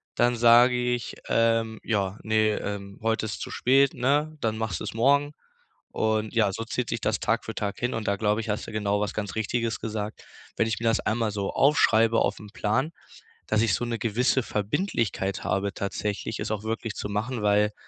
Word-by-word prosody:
Dann 120 0 +3
sag 120 +2 +7
ich: 125 -1 -1
„Ähm, 115 -1 +2
ja, 100 -3 -1
ne, 110 -1 +2
ähm, 100 -1 -6
heute 115 0 +1
ist 110 - -5
zu - - -5
spät, 135 +2 +3
ne, 145 +5 +1
dann 110 -1 0
machst 110 -6 -2
du's - - -4
morgen“ 140 +5 +3 0.6
und 110 -1 0
ja, 105 -4 +3
so 115 - -4
zieht 120 +1 -3
sich 115 - -2
das 110 +1 0
Tag 115 +2 0
für 110 - -6
Tag 100 -1 -3
hin 120 0 -1
und 110 -1 -3
da, 100 - 0
glaub 105 +1 +1
ich, 115 0 -5
hast 105 - -2
du - - -7
genau 105 -1 0
was 105 - -2
ganz 105 -2 -4
Richtiges 115 +1 -1
gesagt, 110 -1 -5 0.3
wenn 115 - +2
ich 110 -1 -2
mir - - -7
das 115 0 +3
einmal 110 -1 0
so 100 -1 -2
aufm 145 +2 +4
Plan 115 0 +3
aufschreibe, 110 +6 0 0.6
dass 110 - +2
ich 110 -5 +2
so - - -1
'n 120 -1 -2
gewisse 125 +4 +1
Verbindlichkeit 105 - -1
habe 100 0 -1
tatsächlich, 105 +2 -3
es - - -3
auch 105 0 -3
wirklich 115 0 -3
zu - - -4
machen, 110 +3 -2
weil, 105 0 +3
110 Hz, 200 wpm, -26 LUFS, 105-120 Hz, 0.6 s, sag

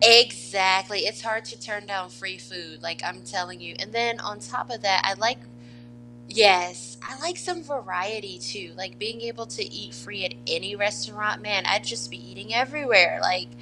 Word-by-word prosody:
Exactly, 195 - +8
it's 210 - -1
hard 225 0 -2 0.2
turn 205 +11 -6
down 190 -2 -4
free 120 - -7
food, - - -11
like, - - -5
I'm - - -6
telling 120 0 -6
you 120 0 -10
and - - -5
then 235 0 0
on 210 0 -6
top 120 - -6
of 235 - -7
that, 195 -2 +4
I 195 - +3
like 225 - +1 0.9
Yes, 180 - +5
I 265 - -10
like 345 +2 -3
some 360 -3 -5
variety 205 - -5
too, 120 0 -7
like, 120 +1 -9
being 225 +2 -5
able 230 -1 -7
to 425 - -6
eat 120 - -9
free 120 - -6
at 120 - -4
any 195 +5 -1
restaurant, 205 - -1
man, 200 -3 +1
I'd - - +3
just 120 0 -4
be 120 0 -12
eating 125 - -8
everywhere, 255 - +5
like 180 -9 +1
195 Hz, 180 wpm, -25 LUFS, -, 0.9 s, Exactly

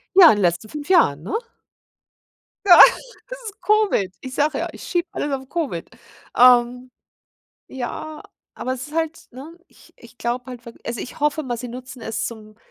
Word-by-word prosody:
Ja, 370 -2 +10
in - - +3
den 205 - -1
letzten 175 +4 0
5 295 +2 -8
Jahren, 155 - +4
ne? 195 - -7 1.3
Ja, 355 - +9 0.5
es - - -7
ist 415 +2 -13
Covid. 415 - +1
Ich 260 0 -8
sage 295 +2 0
ja, - - -2
ich - - -11
schiebe 350 0 -2
alles 290 - -3
auf 265 -1 -4
Covid. 275 - -4 0.5
Ähm, 250 0 +4 0.8
ja, 265 +4 -6 0.3
aber 255 - -4
es 260 +2 -8
ist 300 - -12
halt 325 0 -3
ne? 280 +7 -11
Ich - - -22
ich 240 +1 -18
glaube 240 +1 -3
halt 245 -2 -10
wirkl 230 - -12
also, 235 0 -4
ich 250 - -8
hoffe 300 +1 0
mal, 245 -4 -4
sie 245 +1 -7
nutzen 255 0 -10
es 225 - -3
zum 215 -2 -10
255 Hz, 185 wpm, -21 LUFS, 235-310 Hz, 1.3 s, Ja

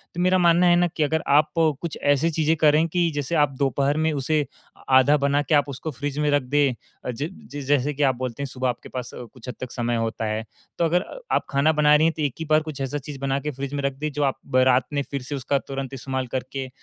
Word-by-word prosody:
तो 175 - -4
मेरा 185 +1 +4
मानना 175 0 +4
है 175 - +6
ना 175 0 +3
कि 160 -1 -2
अगर 160 +2 0
आप 150 +2 +4 0.3
कुछ 170 -2 -4
ऐसी 145 +3 +3
चीज़ें 160 +1 +1
करें 155 +1 +4
कि 170 0 +1
जैसे 145 +3 -2
आप 145 -2 +3
दोपहर 140 +2 +1
में 160 0 +1
उसे, 150 +1 0 0.4
आधा 130 +2 +6
बना 140 +1 +1
के 150 +1 +1
आप 145 0 +2
उसको 145 +4 -5
फ्रिज 145 +2 -5
में 150 0 +2
रख 145 -1 +3
दें 140 0 +2 0.4
अ - - +1
ज 145 +7 -4 0.2
जिस 145 -1 -6
जैसे 145 0 +2
कि 145 - -1
आप 135 -2 +3
बोलते 130 +2 -4
हैं - - -3
सुबह 130 -1 -2
आपके 120 - -6
पास 125 -2 -6
कुछ 120 0 -11
हद - - -6
तक 130 -1 -6
समय 120 -1 -1
होता 115 0 -2
है। 110 +1 -2 0.3
तो 170 - +2
अगर 175 +4 +1 0.3
आप - - +1
खाना 140 +3 +3
बना 150 -1 +5
रही 155 +2 +4
हैं 165 - 0
तो - - -3
एक 140 -5 0
ही 160 - -3
बार 155 0 +5
कुछ 155 -3 -7
ऐसा 135 +2 -2
चीज़ 140 0 -8
बना 135 0 0
के 150 +2 -4
फ्रिज 140 +1 -6
में 140 -1 -2
रख 140 -1 0
दें 155 0 -2
जो 145 0 -1
आप 135 - 0 0.2
रात 130 -1 +4
में 145 - +1
फ़िर 140 -2 -3
से 140 +3 -5
उसका 140 +1 0
तुरंत 135 -1 -5
इस्तेमाल 130 0 -3
करके 130 +1 -4
145 Hz, 265 wpm, -24 LUFS, 130-155 Hz, 0.4 s, है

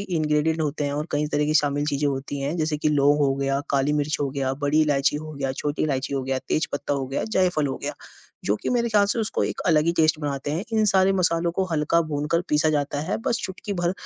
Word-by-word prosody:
ingredient 160 -3 0
होते 150 -1 -1
हैं 140 - -1
और 150 +2 -2
कई 150 +1 0
तरह 145 0 +2
की 155 +1 0
शामिल 145 -1 +2
चीज़ें 145 0 0
होती 140 +1 -4
हैं, 145 +5 -2
जैसे 155 -1 0
कि 155 - 0
लौंग 145 0 +3
हो 140 -2 +2
गया, 135 0 0
काली 140 +1 +2
मिर्च 150 +1 0
हो 140 - 0
गया, 135 -1 -1
बड़ी 150 +2 +3
इलायची 145 -1 +2
हो 155 +1 -7
गया, 135 -2 -2
छोटी 145 +2 -2
इलायची 140 -2 -1
हो 135 - -1
गया, 130 0 -1
तेज़ 155 - +1
पत्ता 145 0 -2
हो 135 -2 -2
गया, 135 - -2
जायफल 180 -8 +1
हो 135 - -3
गया, - - -3 0.5
जो 105 +1 +1
कि - - -2
मेरे 235 -1 +1
ख़्याल 205 -2 +4
से 205 - -1
उसको 220 - -1
एक - - -4
अलग 155 -3 +4
ही 170 - +3
टेस्ट 155 -1 +3
बनाते 145 -1 -3
हैं 175 +7 -2
इन 220 -1 +3
सारे 190 0 +4
मसालों 170 -2 +1
को 190 - +2
हल्का 160 +2 +2
भूनकर 150 +3 0
पीसा 150 +1 +3
जाता 145 -1 -1
है, - - +1
बस 235 - +1
चुटकी 190 +2 -5
भर 175 -2 0
150 Hz, 250 wpm, -24 LUFS, 140-165 Hz, 0.5 s, ख़्याल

